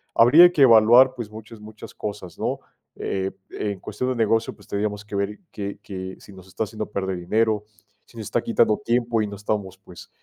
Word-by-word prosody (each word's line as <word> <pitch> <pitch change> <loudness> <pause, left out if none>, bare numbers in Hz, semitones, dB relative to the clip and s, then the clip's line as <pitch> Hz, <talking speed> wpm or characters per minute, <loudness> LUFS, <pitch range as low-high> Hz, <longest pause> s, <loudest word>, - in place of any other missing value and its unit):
habría 155 +10 +8
que 150 -6 +3
evaluar, 120 +2 +7
pues, 120 -4 -6
muchas, 110 +1 -11
muchas 105 0 -11
cosas, 100 -4 -7
¿no?, - - -1 0.4
eh, 95 0 -2 0.2
en 100 -2 -4
cuestión 125 - -4
de 130 - -1
negocio, 115 0 +1
pues - - -20
tendríamos 105 0 -3
que 105 - -7
ver 100 +1 -2
que 100 -1 -6
que 95 -1 -7
si 100 - -15
nos 95 -1 -14
está 95 - -3
haciendo 110 0 -5
perder 95 -2 -3
dinero, 105 +3 0 0.4
si 115 - -19
nos 110 - -6
está 120 - -1
quitando 115 -2 +2
tiempo 120 -2 +1
y 105 - -1
no 100 - -7
estamos, 100 -2 -3
pues, 90 -3 -14
105 Hz, 200 wpm, -23 LUFS, 100-115 Hz, 0.4 s, habría